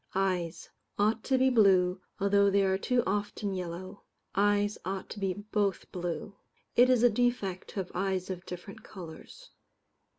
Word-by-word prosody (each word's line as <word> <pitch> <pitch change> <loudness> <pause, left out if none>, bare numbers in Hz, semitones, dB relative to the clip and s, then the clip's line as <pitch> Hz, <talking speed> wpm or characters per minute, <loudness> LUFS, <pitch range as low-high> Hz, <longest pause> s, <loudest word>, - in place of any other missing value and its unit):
Eyes: 185 -4 -1 0.3
ought 215 +2 +2
to 265 - +2
be 260 0 +4
blue, 185 -5 +4 0.2
although 200 0 +4
they 200 0 +3
are 190 0 +2
too 250 +2 +1
often 205 0 -2
yellow. 185 +1 -6 0.3
Eyes 205 +1 +2
ought 190 +1 -4
to 210 - -6
be 195 -1 0
both 205 -1 -2
blue. 175 +2 -4 0.4
It 245 +1 +6
is 250 -2 +4
a 245 - +7
defect 215 -5 0
to - - -13
have 180 - -9
eyes 190 0 -1
of 180 -1 -6
different 180 +2 -8
colours. 185 - -11
195 Hz, 160 wpm, -30 LUFS, 185-210 Hz, 0.4 s, a